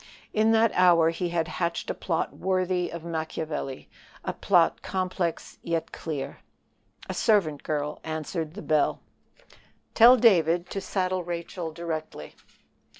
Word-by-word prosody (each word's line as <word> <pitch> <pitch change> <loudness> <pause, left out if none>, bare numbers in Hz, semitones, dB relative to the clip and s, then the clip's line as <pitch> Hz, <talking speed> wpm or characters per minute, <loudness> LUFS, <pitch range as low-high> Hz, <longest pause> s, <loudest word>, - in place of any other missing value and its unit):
In 220 +1 +3
that 225 0 +4
hour 170 -3 +5
he 175 +1 -3
had 170 -1 -1
hatched 170 0 -2
a - - -2
plot 165 -3 -2
worthy 185 -1 0
of 170 -1 -7
Machiavel 160 -4 -4 0.4
a - - -2
plot - - +2
complex 185 -2 -3
yet 165 -1 -2
clear. 150 -5 -5 0.7
A - - -3
servant 180 -10 +2
girl 150 -1 -3
answered 160 +1 -4
the 210 - -7
bell. 155 -2 +1 0.9
"Tell 245 +3 +8
David 175 -6 +3
to 195 - -3
saddle 185 -1 -1
Rachel 170 0 -5
directly." 155 - -6
170 Hz, 130 wpm, -26 LUFS, 160-185 Hz, 0.9 s, Tell